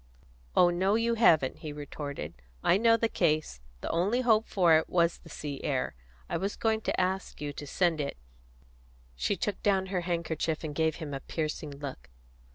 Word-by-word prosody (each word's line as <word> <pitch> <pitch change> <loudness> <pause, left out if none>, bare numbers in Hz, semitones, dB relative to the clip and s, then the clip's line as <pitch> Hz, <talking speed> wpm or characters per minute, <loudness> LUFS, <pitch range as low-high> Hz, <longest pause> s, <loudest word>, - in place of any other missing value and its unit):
"Oh 175 -1 +6
no, 190 +4 +2
you 230 +1 +2
haven't," 160 - +4
he 155 - -6
retorted. 145 - -6 0.3
"I 180 - +5
know 230 +1 +5
the 230 - +1
case. 155 - 0 0.2
The - - -3
only 200 +9 +1
hope 225 -3 +3
for 175 -4 +4
it - - -6
was 170 -1 +2
the 165 - -15
sea 145 -3 -6
air; 135 -4 -1 0.3
I - - -1
was 195 +2 -2
going 220 -1 +1
to - - -1
ask 190 +1 -1
you 145 -1 -4
to 145 - -7
send 165 +1 +1
it 140 - -4 0.5
" - - -30
She - - +2
took 205 - -3
down 195 -2 +2
her 180 - +1
handkerchief 165 -2 -2
and 155 -2 -4
gave 160 0 +1
him 155 -4 -6
a 135 - -3
piercing 155 +1 -3
look. 140 - -8
160 Hz, 190 wpm, -29 LUFS, 145-190 Hz, 0.5 s, Oh